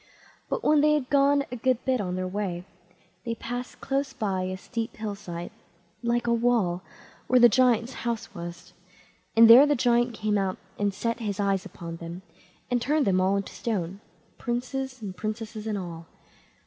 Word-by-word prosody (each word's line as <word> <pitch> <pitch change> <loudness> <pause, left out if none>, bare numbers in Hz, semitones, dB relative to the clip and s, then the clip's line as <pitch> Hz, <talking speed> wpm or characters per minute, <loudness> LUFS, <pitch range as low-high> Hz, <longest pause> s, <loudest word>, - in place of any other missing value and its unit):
But - - -2
when 300 -1 +4
they 300 0 +4
had 275 -4 -2
gone 280 0 +4
a - - -3
good 255 0 0
bit 260 -3 +1
on 180 -2 -3
their 185 0 -2
way, 185 -2 -3 0.6
they 230 -1 -3
passed 245 +2 -6
close 270 0 -1
by 195 -3 -1
a 185 0 -3
steep 230 +3 -5
hill 215 -2 -3
side, 175 -4 -7 0.5
like 240 0 0
a 235 - +2
wall, 230 -7 +2 0.5
where 255 - +5
the 240 - +9
giant's 240 +1 +3
house 235 -2 -3
was, 170 0 -8 0.6
and 230 0 +9
there 250 +6 +10
the 290 - +3
giant 240 -1 +2
came 210 -1 0
out, 190 -1 -1 0.2
and 205 0 +1
set 230 +4 -2
his 210 -4 -3
eyes 195 -2 0
upon 165 -1 -8
them, 170 +2 -8 0.5
and 245 -1 +2
turned 295 +3 +2
them 185 -1 +3
all 190 +2 +2
into 200 - -4
stone, 195 -4 -3 0.4
princes 255 +1 -3
and 190 -3 -5
princesses 215 0 -5
and 210 -2 -1
all. 170 -3 -7
225 Hz, 180 wpm, -27 LUFS, 190-245 Hz, 0.6 s, there